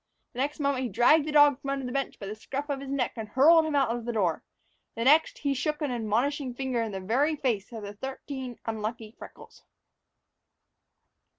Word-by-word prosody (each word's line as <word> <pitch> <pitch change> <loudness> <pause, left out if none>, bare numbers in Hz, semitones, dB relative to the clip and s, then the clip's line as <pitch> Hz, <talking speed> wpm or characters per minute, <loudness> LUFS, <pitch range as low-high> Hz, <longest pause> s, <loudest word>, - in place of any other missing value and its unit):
The 245 - -8
next 290 +3 -1
moment 280 -2 0
he 250 - -2
dragged 265 +9 +4
the - - -2
dog 290 -2 +5
from 275 - -5
under 275 -1 -2
the 250 - -4
bench 275 +1 -2
by 200 - -8
the 200 - -5
scruff 275 +7 -6
of 275 - -2
the 275 - -8
neck 270 -2 -1
and 220 -2 -5
hurled 315 +7 +5
him 305 - -2
out 265 -5 +2
of 240 -1 -6
the 240 - -2
door; 190 -8 0 0.5
the 230 - -2
next, 300 +5 +4
he 280 -1 -1
shook 300 +3 -2
an 295 -4 -2
admonishing 245 +4 -1
finger 260 -2 -1
in 225 -2 -3
the 195 - -4
very 260 +11 +1
face 240 -8 -2
of 225 -2 -7
the 200 0 -7
thirteen 265 +1 -6
unlucky 220 0 -4
freckles. - - -13
260 Hz, 210 wpm, -28 LUFS, 225-285 Hz, 0.5 s, dog